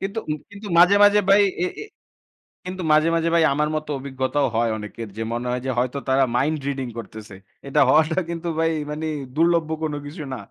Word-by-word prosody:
কিন্তু 200 +3 -4
উ - - +2 0.2
কিন্তু 205 +1 -10
মাঝে, 180 +3 +7
মাঝে, 205 0 +6
ভাই 200 +1 +6 0.2
এ - - +1 0.2
এ - - -7 0.8
কিন্তু 185 0 -5
মাঝে, 155 +1 +4
মাঝে, 165 0 +1
ভাই 165 - +4
আমার 150 +1 +1
মতো 155 0 -4
অভিজ্ঞতাও 135 +1 -1
হয় 115 0 +2
অনেকের। 105 +1 -7
যে - - -4
মনে 120 +1 -3
হয় 125 - -2
যে - - -2
হয়তো 125 +2 0
তারা 135 +1 +4
mind 150 +5 +1
reading 135 -3 -3
করতেছে। 110 -2 -9 0.3
এটা 150 +2 +1
হওয়াটা 160 +3 +3
কিন্তু 170 0 -4
ভাই 165 0 +2 0.2
মানে 150 +1 -4 0.3
দুর্লভ্য 165 0 +2
কোন 155 -2 -1
কিছু 150 +2 -7
না। 130 - -4
150 Hz, 200 wpm, -22 LUFS, 130-170 Hz, 0.8 s, মাঝে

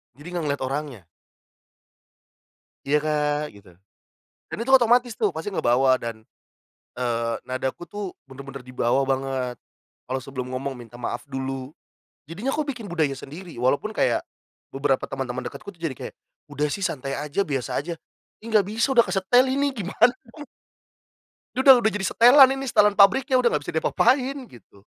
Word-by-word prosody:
Jadi 145 +5 -13
nggak 170 - -2
ngelihat 140 -2 -2
orangnya. 140 -5 -4 1.9
"Iya, 150 +2 +3
Kak", 150 -1 0
gitu. 100 -2 -17 0.8
Dan - - -5
itu 265 +3 -1
otomatis 245 -1 +5
tuh, - - +1
pasti 165 +5 -5
ngebawa 130 -2 +3
dan, 115 -2 -6 0.7
eee, 115 -2 -1
nadaku 130 +6 -4
tuh 200 +1 -6
bener-bener 135 0 -10
di 125 - -12
bawah 130 +2 +1
banget. 130 -2 -2 0.5
Kalau 130 - -1
sebelum 130 -1 -6
ngomong, 135 +1 -3
minta 120 0 -12
maaf 120 - -4
dulu. 135 +1 -5 0.5
Jadinya 200 - -3
aku 310 - 0
bikin 245 -6 -5
budaya 155 -5 0
sendiri. 165 +6 -10
Walaupun 130 - +1
kayak, - - +1 0.5
beberapa 135 -1 0
teman-teman 130 -2 -4
dekatku 200 - -8
tuh, 170 - -27
jadi 160 -5 -2
kayak, - - -8 0.4
"Udah 145 +1 -1
sih 200 - -4
santai 135 -4 -3
aja. 150 +5 -2
Biasa 135 -4 -2
aja". 170 +3 -5 0.4
Ya, - - -21
nggak 205 -3 +4
bisa, 230 +5 0
udah 235 - +7
kesetel 195 +7 +3
ini. 280 +1 0
Gimana? 215 +3 +2 1.4
Udah 260 -2 +7
udah 220 - +3
jadi 200 -1 -2
setelan 260 +3 +7
ini. 270 0 -5
Setelan 210 -2 +4
pabriknya 250 +7 +4
udah 240 - +4
nggak 150 - -1
bisa - - -5
diapa-apain. 255 - +2
Gitu. 100 - -18
150 Hz, 155 wpm, -24 LUFS, 130-215 Hz, 1.9 s, udah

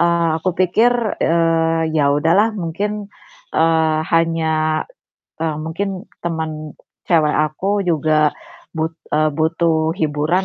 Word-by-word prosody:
Eee, 170 -1 +2
aku 185 - -1
pikir, 220 +7 +3 0.3
eee, 165 -1 +2
ya 140 -1 +3
udahlah 175 +9 +3
mungkin, 200 +3 -3 0.5
eee, 160 -1 +3 0.2
hanya, 160 -1 +1 0.6
eee, 160 -2 -1
mungkin 175 +5 -3 0.4
temen 155 -2 -4 0.3
cewek 155 -3 +3
aku 195 +6 -1
juga 155 -2 +2 0.5
but 160 +1 -2 0.2
eee, 155 0 +3
butuh 160 0 +1
hiburan 155 +4 0
165 Hz, 110 wpm, -19 LUFS, 155-170 Hz, 0.6 s, pikir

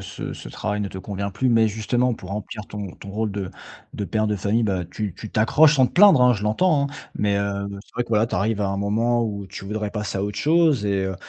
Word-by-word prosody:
ce - - -6
ce - - -9
travail 105 -1 -3
ne 100 - -2
te 95 - -8
convient 100 +1 -4
plus. 130 +7 0
Mais 115 -2 +4
justement, 120 +3 0
pour 95 -4 -11
remplir 105 +1 -6
ton 105 -2 -6
ton 100 - -10
rôle 110 +1 -2
de 100 -2 -4 0.4
de 100 - -3
père 110 +1 0
de 105 - 0
famille, 105 +4 0
bah 95 -4 -1
tu 105 0 -5
tu 110 - -9
t'accroches 150 +8 +4
sans 130 -2 +5
te - - -9
plaindre, 190 -6 +7
hein, 125 0 +6
je 105 -4 -3
l'entends, 140 - +2
hein 140 - -11 0.2
mais 100 -1 +1
heu, 100 0 -2 0.2
c'est - - -26
vrai 120 - 0
que, - - -12
voilà, 110 0 +2
tu - - -5
arrives 105 +3 0
à 100 - +1
un 100 0 -2
moment 115 +4 +1
où 100 -3 -4
tu 95 - -9
voudrais 105 +1 -3
passer 105 -2 -3
à 95 - 0
autre 105 0 -4
chose 155 -7 +3
et 100 -1 0
heu 95 0 -2
105 Hz, 265 wpm, -23 LUFS, 100-120 Hz, 0.4 s, plaindre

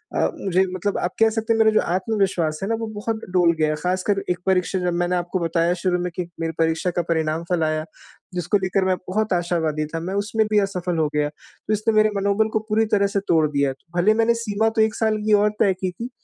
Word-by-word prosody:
अ, - - +2
मुझे 190 -1 +2
मतलब 190 +2 -2
आप 175 - -1
कह 225 0 +5
सकते 225 +1 0
हैं - - 0
मेरा 220 0 +5
जो 215 - +3
आत्मविश्वास 185 -6 0
है - - -1
ना 225 - +1
वो 225 - -3
बहुत 220 +1 -3
डोल 175 -2 +4
गया 155 -1 +2
है। 155 - 0
ख़ासकर 185 +2 0
एक 180 0 0
परीक्षा 190 0 +1
जब 180 -1 -1
मैंने 175 +1 0
आपको 175 +1 -2
बताया 170 0 +1
शुरू 180 -1 +1
में 180 0 -3
कि 180 -2 -3
मेरी 165 0 -1
परीक्षा 160 +2 +1
का - - +3
परिणाम 160 0 0
फल 175 -3 +1
आया, 155 0 -1 0.5
जिसको 180 +3 +1
लेकर 190 0 0
मैं 185 0 +2
बहुत 215 +2 0
आशावादी 165 -3 0
था, 165 - -1
मैं 180 +4 -4
उसमें 220 +2 0
भी 210 - +5
असफल 180 -3 -2
हो 155 -1 +2
गया। 150 0 +1
तो 150 +7 -7
इसने 215 +2 +1
मेरे 215 0 +4
मनोबल 200 +2 +1
को 220 - +2
पूरी 220 +1 +2
तरह 200 -1 +4
से - - +4
तोड़ 160 -2 +3
दिया। 140 -2 +1 0.2
भले 195 +5 +4
मैंने 225 +1 +3
सीमा 220 0 +1
तो - - +5
1 220 0 +2
साल 220 -1 +1
की 215 - +3
और 210 - +4
तय 195 -3 +4
की 185 -1 -1
थी 230 +8 -7
185 Hz, 245 wpm, -22 LUFS, 170-215 Hz, 0.5 s, कह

